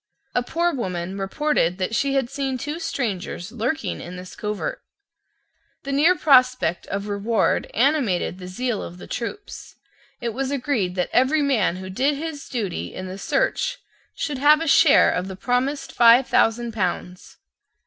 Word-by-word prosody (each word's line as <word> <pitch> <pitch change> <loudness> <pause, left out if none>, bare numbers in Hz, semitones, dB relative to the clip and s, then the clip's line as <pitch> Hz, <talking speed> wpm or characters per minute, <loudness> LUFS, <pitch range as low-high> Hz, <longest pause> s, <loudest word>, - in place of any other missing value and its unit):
A 245 - +2
poor 340 +7 0
woman 185 -7 -3
reported 195 - 0
that 190 +3 -2
she 275 +4 +1
had 265 -3 +1
seen 270 0 -3
two 295 +6 -5
strangers 215 - -3
lurking 245 +7 -2
in 175 +1 -8
this 180 0 -9
covert. 210 -1 -4 1.0
The 275 - -4
near 310 +6 +4
prospect 255 - +3
of 200 +1 -4
reward 210 +2 0
animated 235 - +1
the 180 - -8
zeal 235 +4 -2
of 175 - -8
the - - -10
troops. 400 - -6 0.4
It 240 - -2
was 265 +3 -2
agreed 245 -9 -1
that 180 -1 -1
every 280 +4 +3
man 230 -11 +2
who 185 0 -7
did 275 +9 +1
his 305 -1 -6
duty 210 -8 -4
in 185 - -5
the 185 +1 -7
search - - 0 0.4
should 290 -4 -3
have 300 +2 +6
a 330 - -2
share - - +6
of 180 +1 -2
the 190 - -6
promised 250 +7 -1
five 240 +2 +6
thousand 235 +1 +2
pounds. 180 -3 -4
240 Hz, 160 wpm, -23 LUFS, 190-280 Hz, 1.0 s, have